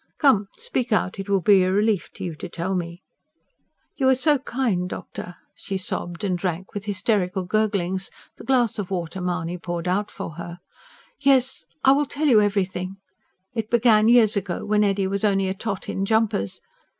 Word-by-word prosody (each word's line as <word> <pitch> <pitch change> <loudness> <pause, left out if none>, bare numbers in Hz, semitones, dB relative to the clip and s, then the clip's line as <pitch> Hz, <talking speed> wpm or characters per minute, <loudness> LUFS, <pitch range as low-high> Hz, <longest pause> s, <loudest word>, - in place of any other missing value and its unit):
Come, 215 -9 +4
speak 455 - -2
out. 195 -2 +1
It 195 +1 -5
will 195 -1 +2
be 195 +2 +5
a 185 0 +2
relief 205 -1 +1
to - - -8
you 175 - -3
to 185 - -7
tell 175 +3 -3
me." 175 0 -4 0.9
"You 265 -2 +3
are 265 - +5
so 290 +2 +3
kind, 230 -9 -1
doctor," 180 - -7 0.2
she 195 - -5
sobbed, 175 0 -4
and 190 -3 +1
drank, 180 0 -3
with 205 0 -5
hysterical 195 -2 0
gurglings, 195 -2 0 0.3
the - - -11
glass 245 -5 +2
of 195 - -3
water 180 0 -3
Mahony 180 -1 -2
poured 175 0 -4
out 200 +3 0
for - - -6
her. 170 0 -7 0.6
"Yes, 265 -7 +2 0.2
I 265 - +7
will 285 +1 +3
tell 290 +3 -2
you 235 -7 +6
everything. 190 -2 -1 0.6
It 225 -2 -3
began 225 -2 +4
years 230 -2 +5
ago 190 -3 -3
when 210 0 +2
Eddy 200 -1 +1
was 195 +1 -2
only 195 -2 +2
a 190 - -1
tot 200 -1 -4
in 195 - -2
jumpers. 205 - 0
195 Hz, 185 wpm, -23 LUFS, 180-220 Hz, 0.9 s, I